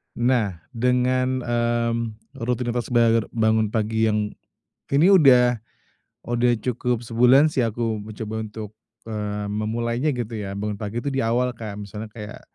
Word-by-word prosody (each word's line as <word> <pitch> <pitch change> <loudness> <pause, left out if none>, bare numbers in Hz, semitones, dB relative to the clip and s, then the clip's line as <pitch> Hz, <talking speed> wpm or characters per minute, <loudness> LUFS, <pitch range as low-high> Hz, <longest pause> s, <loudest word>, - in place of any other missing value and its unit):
Nah, 120 -8 +1
dengan, 125 +2 +1
mmm, 120 -1 0 0.5
rutinitas 120 -1 -1
bagara 115 -2 +4
bangun 110 -1 +2
pagi 110 0 +1
yang 105 -1 +1 0.6
ini 145 +5 +4
udah 125 -7 +6 0.7
udah 120 +1 +1
cukup 125 -1 -1
sebulan 125 +6 +5
sih, 135 - -1
aku 115 -2 0
mencoba 110 +1 -6
untuk, 110 -1 -6 0.3
eee, 105 -2 -4
memulainya 115 +6 -1
gitu 120 -2 -4
ya, 100 -3 -5
bangun 105 0 -3
pagi 115 +3 -4
itu 140 - -1
di 135 - -1
awal 125 +1 +1
Kak. 110 -4 -7
Misalnya 105 +1 -7
kayak, 105 0 -9
115 Hz, 140 wpm, -23 LUFS, 110-125 Hz, 0.7 s, udah